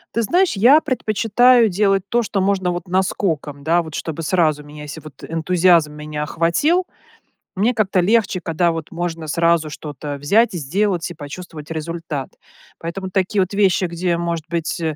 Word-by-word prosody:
Ты 230 - +2
знаешь, 355 - +2
я 255 +10 +6
предпочитаю 240 -2 +3
делать 195 0 +2
то, 240 +3 +1
что 205 -3 -2
можно, 190 -1 +1
вот, 175 +1 -4
наскоком, 165 -6 -1
да, 170 +3 +3
вот 160 -2 -8
чтобы 160 0 -4
сразу 155 -3 +1
меня, 150 0 -11
еси 150 +2 -8
вот 150 -4 -13
энтузиазм 165 -1 +3
меня 150 0 -6
охватил, 170 - +1 0.7
мне 215 +6 +1
как-то 195 -4 +1
легче, 200 -1 +2
когда, 170 0 +1
вот, 165 -2 -5
можно 170 -2 -4
сразу 165 0 +2
что-то 145 -1 -7
взять 200 +9 +2
и - - -2
сделать, 175 +3 -1
и - - -6
почувствовать 155 0 -9
результат. 160 -3 -5 0.5
Поэтому 185 +3 -5
такие 195 +2 0
вот 185 - -7
вещи, 195 -2 +2
где, 170 0 -1
может 170 -2 -3
быть, 170 0 -2
175 Hz, 165 wpm, -20 LUFS, 160-195 Hz, 0.7 s, я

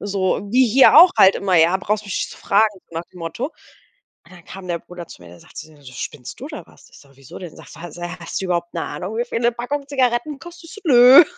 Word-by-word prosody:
so 195 -2 -1
wie 255 +3 +4
hier 255 +4 +5
auch 355 +2 +9
halt 190 0 +6
immer: 190 -2 -1
„Ja, 165 +3 +4
brauchst 210 +2 -2
mich 200 - -5
nicht - - -4
zu - - -12
fragen“, 215 +2 +2 0.2
so - - -17
nach 170 - -7
dem 180 - -14
Motto. 165 - -4 0.8
Und 180 - -19
dann 175 - -18
kam 190 -1 -11
der 170 -1 -2
Bruder 175 0 -11
zu - - -14
mir, 85 - -14
der 85 0 -15
sagt - - -20
zu 155 - -10
mir 145 -2 -21
so: 130 -2 -13
„Spinnst 130 0 -8
du - - -7
oder 305 -1 -9
was?“ - - -21
Ich - - -17
so: 140 - -21
„Wieso 135 -1 -13
denn?“ 175 -4 -10
Sagt - - -14
er: 175 +1 -8
„Hast 170 - -5
du - - -5
überhaupt 175 -1 -2
'ne 165 - -3
Ahnung, 200 +5 -6
wie 240 - 0
viel 230 - -4
'ne 235 0 +2
Packung 275 +4 -5
Zigaretten, 265 +1 -1
kostet?“ 345 0 -13
Ich - - -11
so: - - -11
„Nö.“ 255 +3 +8
195 Hz, 275 wpm, -20 LUFS, 170-245 Hz, 0.8 s, auch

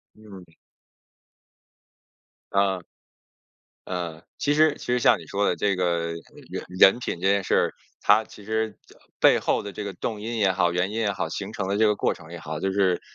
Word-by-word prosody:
嗯。 95 -6 -14 2.0
啊， 100 -2 +2 1.1
呃， 85 -3 -5
其 145 - +1
实 155 0 +4
其 - - -10
实 125 0 +2
像 - - +4
你 - - -12
说 100 +1 0
的 90 - +1
这 100 -2 +1
个 85 -2 0 0.4
人 - - -5
人 95 +4 +6
品 105 - -4
这 95 - -2
件 100 0 +3
事 - - 0
儿， - - +2 0.3
它 105 +2 +5
其 105 - -14
实 110 +1 -2
这 - - -19 0.3
背 - - +6
后 - - 0
的 100 -1 -7
这 105 - -6
个 100 - -5
动 105 +4 -4
因 115 +2 -4
也 100 -3 +3
好， 90 -1 +2
原 90 +2 0
因 110 - -4
也 105 -3 +1
好， - - -2
形 - - -5
成 95 - -2
的 100 +2 -1
这 110 - +5
个 105 - +2
过 - - +1
程 80 -1 -12
也 85 - -7
好， 80 -1 -6
就 95 - 0
是， 95 -3 +2
100 Hz, 220 characters per minute, -25 LUFS, 90-105 Hz, 2.0 s, 人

